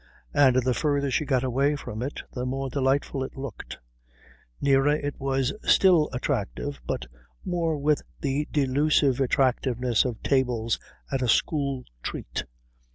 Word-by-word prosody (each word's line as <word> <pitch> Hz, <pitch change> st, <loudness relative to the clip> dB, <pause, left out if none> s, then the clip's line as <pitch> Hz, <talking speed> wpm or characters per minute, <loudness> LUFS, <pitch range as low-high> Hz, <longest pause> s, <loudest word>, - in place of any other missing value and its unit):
And 135 Hz, -3 st, +5 dB
the 125 Hz, 0 st, +2 dB
further 140 Hz, 0 st, 0 dB
she 150 Hz, -, +1 dB
got 130 Hz, -2 st, +1 dB
away 135 Hz, +3 st, +1 dB
from 110 Hz, -6 st, -6 dB
it 135 Hz, +4 st, -4 dB
the 125 Hz, -, -3 dB
more 135 Hz, +1 st, -3 dB
delightful 135 Hz, 0 st, 0 dB
it 130 Hz, -, -8 dB
looked. 135 Hz, -5 st, -7 dB, 0.8 s
Nearer 140 Hz, +1 st, +3 dB
it 145 Hz, -1 st, -4 dB
was 135 Hz, -1 st, 0 dB
still 175 Hz, -6 st, +5 dB
attractive 135 Hz, +2 st, -3 dB
but 60 Hz, -, -2 dB, 0.4 s
more 170 Hz, -4 st, 0 dB
with 145 Hz, +1 st, +2 dB, 0.2 s
the 140 Hz, +1 st, -1 dB
delusive 140 Hz, -1 st, +2 dB
attractiveness 125 Hz, -2 st, +2 dB
of 120 Hz, -4 st, -4 dB
tables 125 Hz, -4 st, +1 dB, 0.3 s
at 135 Hz, -1 st, 0 dB
a 125 Hz, -, +1 dB
school 140 Hz, -1 st, +1 dB, 0.2 s
treat. -, -, -4 dB
135 Hz, 140 wpm, -26 LUFS, 125-145 Hz, 0.8 s, And